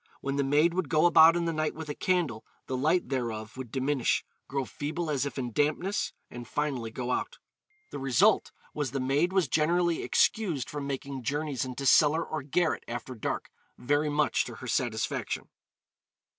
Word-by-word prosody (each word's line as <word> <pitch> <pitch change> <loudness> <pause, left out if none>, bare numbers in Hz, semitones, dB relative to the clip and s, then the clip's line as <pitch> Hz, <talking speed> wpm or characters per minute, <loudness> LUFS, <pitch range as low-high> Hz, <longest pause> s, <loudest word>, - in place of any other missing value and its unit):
When 140 0 -3
the 140 - +1
maid 150 +5 +3
would 180 -5 -1
go 155 +3 +3
about 165 -1 +7
in 170 -1 0
the 165 - 0
night 155 -1 -1
with 160 0 -7
a 145 - -3
candle, 165 -14 0 0.2
the 130 - -3
light 155 +7 +1
thereof 115 -5 -3
would 130 -3 -7
diminish, 135 0 0 0.2
grow 135 -1 -2
feeble 155 +4 -4
as 140 -1 0
if 140 - -8
in 125 -2 -3
dampness, 155 - 0 0.2
and 120 -1 -9
finally 135 -5 -2
go 125 +2 -4
out. - - -2 0.5
The - - -5
result 135 -3 +3 0.2
was 145 -3 -2
the 135 - -1
maid 140 +7 +1
was 190 -5 +2
generally 170 +4 +2
excused 175 - +1
from 145 -1 -4
making 140 -1 -4
journeys 140 0 -2
into 130 +2 -5
cellar 155 +4 +5
or 155 -1 -4
garret 160 +5 0
after 120 +2 -5
dark, 110 - -4 0.3
very 145 +4 +1
much 150 +1 +2
to - - -8
her - - -9
satisfaction. - - -2
145 Hz, 180 wpm, -29 LUFS, 130-160 Hz, 0.5 s, about